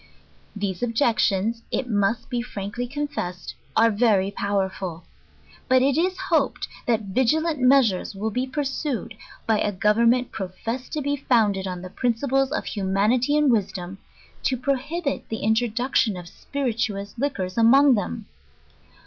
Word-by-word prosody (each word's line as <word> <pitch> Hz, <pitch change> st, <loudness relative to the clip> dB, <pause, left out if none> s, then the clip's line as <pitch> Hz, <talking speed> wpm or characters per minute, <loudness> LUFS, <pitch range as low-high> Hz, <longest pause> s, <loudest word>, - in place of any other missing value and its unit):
These 200 Hz, -3 st, -3 dB
objections, 230 Hz, -2 st, +1 dB
it 260 Hz, -, -2 dB
must 220 Hz, +1 st, 0 dB
be 245 Hz, -2 st, -2 dB
frankly 235 Hz, +1 st, -5 dB
confessed, 245 Hz, -11 st, -4 dB, 0.2 s
are 230 Hz, 0 st, +5 dB
very 205 Hz, -3 st, +2 dB
powerful. 190 Hz, -4 st, -2 dB, 0.7 s
Hut 255 Hz, 0 st, +5 dB
it 275 Hz, 0 st, +3 dB
is 370 Hz, +3 st, +1 dB
hoped, 300 Hz, -1 st, +1 dB, 0.2 s
that 230 Hz, -2 st, +2 dB
vigilent 305 Hz, -, +2 dB
measures 250 Hz, -8 st, +3 dB
will 215 Hz, +3 st, -2 dB
be 250 Hz, +4 st, -1 dB
pursued, 275 Hz, -3 st, -3 dB, 0.3 s
by 220 Hz, -2 st, +2 dB
a 205 Hz, -, +1 dB
government 230 Hz, +5 st, +2 dB
professed 225 Hz, +7 st, -5 dB
to 300 Hz, -, -2 dB
be 285 Hz, +1 st, 0 dB
founded 210 Hz, -8 st, +2 dB
en 180 Hz, -1 st, -5 dB
the 185 Hz, -, -7 dB
princip'es 265 Hz, +4 st, 0 dB
of 310 Hz, -, -2 dB
humanity 215 Hz, +8 st, +1 dB
and 300 Hz, -3 st, +4 dB
wisdom, 195 Hz, -3 st, -2 dB, 0.4 s
to 260 Hz, -, 0 dB
prohibit 280 Hz, +4 st, -2 dB
the 220 Hz, -, -4 dB
introduc 235 Hz, +3 st, 0 dB
tion 215 Hz, -6 st, +3 dB
of 175 Hz, -1 st, -8 dB
spirituous 225 Hz, -4 st, -3 dB
liquors 195 Hz, -10 st, -2 dB
among 265 Hz, +5 st, +6 dB
them. 220 Hz, 0 st, -2 dB
230 Hz, 140 wpm, -24 LUFS, 200-270 Hz, 0.7 s, among